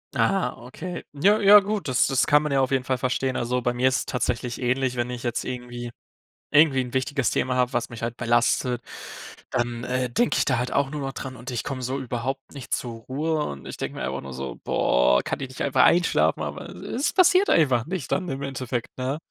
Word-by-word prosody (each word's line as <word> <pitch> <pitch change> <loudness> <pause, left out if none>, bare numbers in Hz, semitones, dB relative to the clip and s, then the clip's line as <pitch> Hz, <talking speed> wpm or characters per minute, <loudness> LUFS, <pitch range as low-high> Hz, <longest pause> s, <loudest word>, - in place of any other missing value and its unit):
Ah, 195 -1 +1
okay. 170 +7 -7
Ja, 200 +9 +3
ja 205 +1 +9
gut, 200 -6 -3
das 125 - +3
das 135 -1 +2
kann 150 0 +5
man 150 - -2
ja 135 - +3
auf 130 0 0
jeden 130 -1 +1
Fall 130 - 0
verstehen. 130 +1 -1
Also, 125 +1 -1
bei 125 0 0
mir 130 +2 +3
ist 125 - 0
es - - -3
tatsächlich 120 -1 -2
ähnlich, 125 +1 0
wenn 120 0 -1
ich 125 -1 -6
jetzt 120 -1 -1
irgendwie 120 -1 -6 0.6
irgendwie 145 -3 +5
'n 125 0 -6
wichtiges 130 -1 0
Thema 125 0 0
habe, 125 0 +2
was 120 -1 -1
mich 115 -1 -9
halt 115 0 -3
belastet, 120 +1 +1 0.7
dann, 120 0 -1
äh, 125 0 -1
denke 235 - +1
ich - - +3
da 130 -3 +2
halt 125 +1 -2
auch 140 -1 +2
nur 150 0 -5
noch 135 - -3
dran 130 -1 -6
und 125 - -8
ich 120 - -2
komme 135 -2 -4
so 130 +3 -2
überhaupt 130 +2 -4
nicht 140 -3 -6
zur 115 -2 -3
Ruhe 150 +4 -1
und 70 -1 -7
ich - - -6
denke - - -4
mir - - -4
einfach 65 +2 -3
nur 70 0 -8
so: 65 +1 -6
„Boah, 60 0 +3
kann - - -3
ich 135 - -3
nicht 130 - -9
einfach 130 -2 +3
einschlafen?“ 175 +1 +3
Aber, - - -6
es 270 +5 -4
es - - +1
passiert 370 +1 +5
einfach 130 -7 +3
nicht 180 -4 -5
dann 185 -1 0
im 135 +1 -4
Endeffekt, 130 -3 -4
ne? 130 +3 -2
130 Hz, 235 wpm, -25 LUFS, 120-140 Hz, 0.7 s, ja